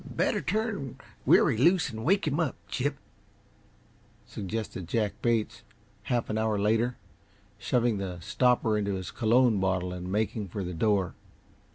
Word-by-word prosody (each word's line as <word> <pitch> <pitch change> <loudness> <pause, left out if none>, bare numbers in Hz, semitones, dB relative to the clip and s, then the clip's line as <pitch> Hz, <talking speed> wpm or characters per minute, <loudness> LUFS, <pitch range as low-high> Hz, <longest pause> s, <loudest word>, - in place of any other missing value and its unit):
"Better - - -1
turn 210 - -2 0.3
Weary - - +5
loose 165 +3 +3
and 110 0 -6
wake 190 - +2
him 150 +1 0
up, 160 -6 0
Chip," - - -2 1.3
suggested 100 -3 -5
Jack 105 +1 0
Bates, 115 -2 0 0.4
half 120 -2 0
an 110 - -1
hour 110 -1 +1
later, 110 +4 +1 0.6
shoving 115 +1 +1
the 90 -3 -4
stopper 115 +3 +2
into 100 -1 -1
his 95 -1 -5
cologne 120 -1 +3
bottle 90 -1 0
and 90 0 -6
making 105 0 -1
for 95 +2 -4
the 90 0 -4
door. 95 +1 +1
110 Hz, 145 wpm, -28 LUFS, 95-125 Hz, 1.3 s, Weary